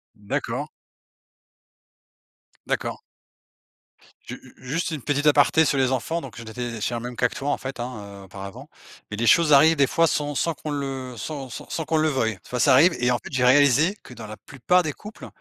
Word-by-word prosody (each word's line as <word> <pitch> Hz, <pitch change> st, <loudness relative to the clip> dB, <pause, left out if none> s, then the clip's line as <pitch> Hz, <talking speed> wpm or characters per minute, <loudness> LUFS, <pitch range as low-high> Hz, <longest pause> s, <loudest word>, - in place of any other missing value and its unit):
D'accord. 100 Hz, -1 st, -4 dB, 2.0 s
D'accord. -, -, -2 dB, 1.2 s
Ju -, -, -7 dB
u -, -, -17 dB
juste 165 Hz, +5 st, -2 dB
une 155 Hz, -3 st, -4 dB
petite 145 Hz, +2 st, -1 dB
aparté 150 Hz, +2 st, +5 dB
sur 140 Hz, -, +1 dB
les 130 Hz, -1 st, +2 dB
enfants, 135 Hz, +7 st, -1 dB
donc 125 Hz, -, -10 dB
j'en 115 Hz, -, -8 dB
étais 120 Hz, +2 st, -5 dB
je -, -, -7 dB
suis 105 Hz, -, -2 dB
dans 120 Hz, -, -2 dB
le -, -, -9 dB
même 125 Hz, -, -6 dB
cas 125 Hz, -, +2 dB
que -, -, -12 dB
toi, 140 Hz, +1 st, -3 dB
en -, -, +1 dB
fait, 135 Hz, -1 st, -7 dB
hein, 105 Hz, -5 st, -7 dB
auparavant. 95 Hz, +1 st, -10 dB, 0.4 s
Mais 105 Hz, -, -5 dB
les 120 Hz, -, 0 dB
choses 165 Hz, +4 st, +5 dB
arrivent 155 Hz, +3 st, +7 dB
des 140 Hz, -2 st, +4 dB
fois 165 Hz, -, +3 dB
sans 145 Hz, -1 st, -1 dB
sans 165 Hz, +4 st, 0 dB
qu'on 155 Hz, -, -8 dB
le 135 Hz, -3 st, -4 dB
sans 135 Hz, +1 st, -6 dB
sans -, -, -8 dB
sans 160 Hz, -, -3 dB
qu'on 160 Hz, -, 0 dB
le 155 Hz, 0 st, +2 dB
veuille. 130 Hz, -7 st, 0 dB
Des 95 Hz, -, -18 dB
fois 125 Hz, -, -3 dB
ça 115 Hz, -, +5 dB
arrive 165 Hz, +7 st, +6 dB
et 125 Hz, -, +2 dB
en 125 Hz, -, +2 dB
fait, -, -, -11 dB
j'ai 130 Hz, -2 st, 0 dB
réalisé 145 Hz, -, +4 dB
que -, -, -12 dB
dans 115 Hz, -2 st, -9 dB
la 110 Hz, +1 st, -9 dB
plupart 180 Hz, +7 st, +1 dB
des 155 Hz, -3 st, -3 dB
couples, 210 Hz, +1 st, -11 dB
135 Hz, 220 wpm, -24 LUFS, 120-150 Hz, 2.0 s, arrivent